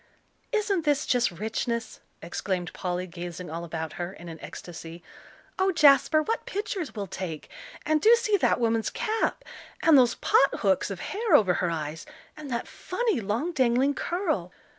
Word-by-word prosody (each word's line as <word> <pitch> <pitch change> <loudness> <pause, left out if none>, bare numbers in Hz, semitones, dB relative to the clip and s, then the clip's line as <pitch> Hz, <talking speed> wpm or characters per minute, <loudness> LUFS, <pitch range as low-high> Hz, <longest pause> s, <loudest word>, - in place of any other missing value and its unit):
"Isn't 415 -6 +1
this 295 -1 +1
just 245 -1 +2
richness?" 225 +5 -3 0.2
exclaimed 180 -4 -3
Polly, 180 -1 -3
gazing 175 -1 -7
all 165 +1 -4
about 160 -1 -5
her 175 +2 -4
in 175 -3 -10
an 165 -1 -9
ecstasy. 170 0 -9 0.6
"Oh, 380 0 +3
Jasper, 305 -1 +5
what 450 +8 -2
pictures 390 - -4
we'll 205 -2 -3
take 170 -4 -6 0.4
and 310 -1 +2
do 455 +2 +7
see 465 -3 +1
that 345 - +2
woman's 225 -1 +1
cap! 450 -2 -1 0.4
and 325 -2 +7
those 245 -1 +4
pot 275 - +3
hooks 195 -2 +2
of 195 -3 -6
hair 420 -4 +1
over 195 -9 +5
her 175 0 0
eyes, 155 - -4 0.3
and 300 -2 -9
that 235 -2 -3
funny, 430 - -2
long 225 - -1
dangling 260 -1 +2
curl!" 310 - -2
235 Hz, 160 wpm, -27 LUFS, -, 0.6 s, do